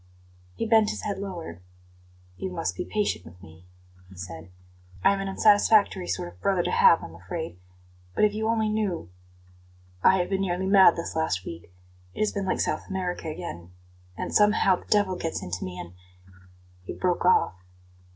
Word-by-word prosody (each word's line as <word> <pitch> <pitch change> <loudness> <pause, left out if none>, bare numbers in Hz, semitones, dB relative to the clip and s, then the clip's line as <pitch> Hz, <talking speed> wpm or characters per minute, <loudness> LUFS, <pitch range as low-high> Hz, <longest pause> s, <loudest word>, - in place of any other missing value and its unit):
He - - -2
bent 220 -1 +4
his - - -5
head 200 -2 -3
lower. 170 - -7 0.7
"You 95 0 -4
must 90 0 -3
be - - -4
patient 210 - -1
with 85 +1 -14
me," 85 0 -15 0.4
he 95 - -14
said. 90 -2 -8 0.5
"I - - +5
am 200 - -3
an 195 - -3
unsatisfactory 205 - +4
sort 90 0 -2
of 90 - -24
brother 190 -3 +1
to - - -1
have, 470 0 +5
I'm - - -9
afraid; 160 - -6 0.6
but - - +2
if 210 -1 +4
you 220 +1 -2
only 225 -1 +1
knew 205 - -2 0.9
I 190 - +6
have 180 -1 0
been 195 0 0
nearly 185 -1 -1
mad 190 -3 +6
this 170 - -5
last 160 - -1
week. 85 +1 -9 0.4
It - - -9
has 215 - +2
been 200 -2 -3
like - - 0
South - - -1
America 180 -3 -3
again. 85 - -7 0.4
And - - -4
somehow 210 -3 +4
the - - -15
devil 205 -3 +2
gets 165 - -3
into 90 0 -4
me 90 -1 -6
and 90 0 -8 0.5
" 90 0 -27
He - - -4
broke 180 -1 -1
off. 180 - +4
180 Hz, 185 wpm, -26 LUFS, -, 0.9 s, I